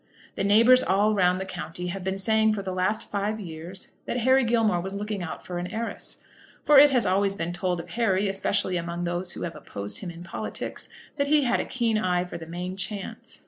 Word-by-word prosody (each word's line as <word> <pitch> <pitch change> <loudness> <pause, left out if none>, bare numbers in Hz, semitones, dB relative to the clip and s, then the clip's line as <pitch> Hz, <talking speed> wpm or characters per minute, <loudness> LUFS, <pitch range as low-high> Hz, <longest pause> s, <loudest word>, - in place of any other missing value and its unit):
The - - -2
neighbours 230 +6 +6
all 205 +3 +2
round 180 -2 +3
the 190 - -3
country 180 -1 -6
have 195 -1 -6
been 190 +1 -2
saying 220 +2 +3
for 200 -2 -3
the 190 -1 -3
last 185 +4 -1
five 210 +2 -1
years 175 0 -8 0.2
that - - -1
Harry 260 +2 +5
Gilmore 225 -6 +2
was 190 +2 -5
looking 205 -1 -3
out 175 - -6
for 175 -1 -4
an 175 - -3
heiress; 225 +3 -5 0.4
for 295 -2 +7
it 290 +1 +9
has 250 -4 +3
always 195 +1 +2
been 170 -1 -3
told 175 0 -1
of 170 - -8
Harry, 205 -4 +1
especially 195 -1 0
among 170 +1 -3
those 175 +1 -2
who - - -6
have 170 - -4
opposed 100 0 -4
him 180 - -6
in 170 0 -9
politics, 185 - -6 0.3
that 280 -1 +1
he 300 0 +4
had 240 - +2
a - - -1
keen 230 -4 0
eye 180 -3 +1
for 180 - -7
the 160 - -9
main 180 +2 -5
chance. 195 +1 -5
195 Hz, 225 wpm, -26 LUFS, 180-220 Hz, 0.4 s, it